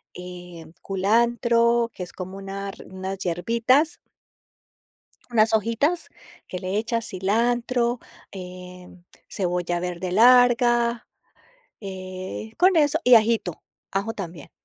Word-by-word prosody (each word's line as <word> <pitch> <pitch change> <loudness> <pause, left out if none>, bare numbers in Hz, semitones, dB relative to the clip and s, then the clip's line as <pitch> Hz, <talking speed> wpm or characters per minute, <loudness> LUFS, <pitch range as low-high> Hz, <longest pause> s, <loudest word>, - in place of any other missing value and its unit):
eh, 180 -2 -9 0.2
culantro, 235 +3 +2
que 180 - -6
es 175 - -10
como 185 +1 -7
unas 195 0 -6
unas 190 +1 -5
hierbitas 230 - +1 1.3
unas 220 -1 +3
hojitas, 230 - 0 0.4
que 180 - -5
le 185 +2 -2
echas 230 0 -2
cilantro, 235 +5 0 0.3
em, 180 -1 -10 0.2
cebolla 175 -2 -2
verde 180 0 -4
larga, 240 +1 +4 0.7
eh 190 +2 -7
con 370 +2 +5
eso 300 0 +3
y 250 - +7
ajito, 220 -6 +2 0.3
ajo 200 +4 -1
también. 175 -8 -8
205 Hz, 100 wpm, -24 LUFS, 185-235 Hz, 1.3 s, y